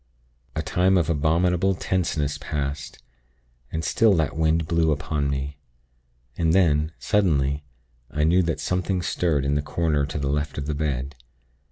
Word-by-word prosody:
"A 80 - -1
time 90 +5 +2
of 85 -2 +1
abominable 85 +5 +2
tenseness 80 -6 -1
passed, 70 0 -4 0.7
and 80 0 -3
still 110 +6 +3
that 80 -4 0
wind 80 0 +2
blew 85 -1 +2
upon 75 -1 -1
me; 70 +1 -3 0.8
and 80 -1 +1
then, 80 -4 +3
suddenly, 75 -8 +1 0.5
I 75 - -1
knew 85 +4 +4
that 85 -2 -1
something 90 0 -1
stirred 80 -6 0
in 70 - +1
the 75 - +1
corner 75 -1 0
to 75 - -4
the 70 -1 -2
left 75 +1 -2
of 70 - -3
the 75 - -2
bed. 70 -2 -2
80 Hz, 155 wpm, -24 LUFS, 70-85 Hz, 0.8 s, knew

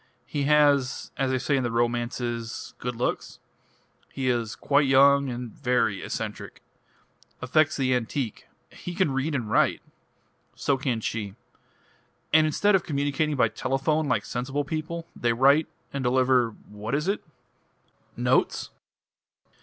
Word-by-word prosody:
He 145 -1 -2
has 145 -3 +3
as 135 -1 0
they 130 - +1
say 130 +2 0
in 135 - +1
the 120 - -1
romances 120 0 -2
good 125 -1 -4
looks. 120 - -3 0.7
He 130 -1 -1
is 120 -3 -1
quite 145 0 +2
young 140 +1 +5
and 120 -1 -5
very 115 -6 0
eccentric. - - -6 0.8
Affects 155 +5 +2
the 130 -2 +1
antique 125 -1 -3 0.2
he 175 - -8
can 185 -6 +2
read 135 +3 -1
and 120 -5 -2
write! - - +2 0.8
So 140 - +1
can 130 -4 -2
she. 105 -3 -4 1.0
And 155 0 +6
instead 205 +7 +2
of 190 - +4
communicating 145 0 -1
by 130 - +3
telephone, 150 +4 0
like 130 - 0
sensible 135 +4 -2
people, 160 +3 -4
they 120 -1 +1
write 140 +6 +4 0.3
and 140 -1 -2
deliver 125 -1 +3 0.2
what 105 +4 -4
is 150 +4 -1
it?" 200 - -1 0.9
"Notes?" - - +1
135 Hz, 140 wpm, -26 LUFS, 120-145 Hz, 1.0 s, And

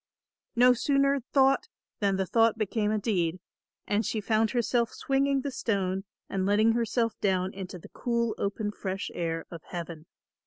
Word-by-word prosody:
No 250 +1 +6
sooner 275 +2 +2
thought 270 +8 +4 0.3
than 200 -2 +2
the 190 0 0
thought 225 +4 +3
became 215 0 0
a 215 - +1
deed, 185 -5 0 0.5
and 210 +2 +1
she 220 - -1
found 220 +1 +2
herself 240 -1 +1
swinging 275 0 +1
the 280 - -3
stone 195 -6 -1 0.2
and 190 -1 -2
letting 210 +3 +4
herself 230 0 0
down 190 -1 +1
into 190 -1 -7
the 170 - -13
cool 235 -2 -1
open 205 +1 -2
fresh 195 -1 -4
air 165 -1 -2
of 170 -2 -8
heaven. 170 -2 -7
215 Hz, 160 wpm, -28 LUFS, 190-235 Hz, 0.5 s, No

